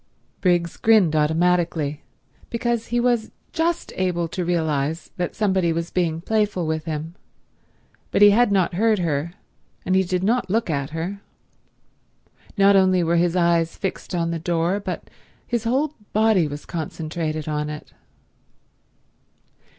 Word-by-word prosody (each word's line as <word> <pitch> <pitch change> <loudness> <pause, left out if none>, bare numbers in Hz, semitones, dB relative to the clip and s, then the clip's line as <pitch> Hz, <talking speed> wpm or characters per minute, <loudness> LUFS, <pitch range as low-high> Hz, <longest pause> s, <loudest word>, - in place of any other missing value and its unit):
Briggs 175 -2 +1
grinned 210 -8 +4
automatically, 160 -1 +1 0.5
because 235 -1 -1
he 240 +1 0
was 240 -2 +1 0.2
just 330 +1 -1
able 180 -2 0
to 180 +2 -3
realize 160 -2 -1
that 175 -1 -3
somebody 190 -5 +1
was 165 +1 -3
being 165 -3 0
playful 210 -3 0
with 160 0 -2
him, 160 0 -4 1.0
but 205 - +3
he 205 - +9
had 235 +1 +4
not 185 -2 +2
heard 220 +4 +2
her 165 -2 -1 0.5
and 185 - 0
he 190 - +5
did 180 0 -2
not 235 +1 +1
look 220 -2 0
at 140 -2 -2
her. 175 +6 -5 1.4
Not 200 0 +5
only 185 -2 +4
were 170 +1 +2
his 175 0 +2
eyes 170 -2 +2
fixed 195 -1 -4
on 170 -1 0
the 165 - -2
door 170 +3 0
but 200 - -5 0.4
his 235 -2 -2
whole 275 +6 +1 0.2
body 215 -6 +3
was 145 0 -7
concentrated 155 -1 -4
on 150 0 -2
it. 150 0 -8
175 Hz, 145 wpm, -22 LUFS, 160-205 Hz, 1.4 s, he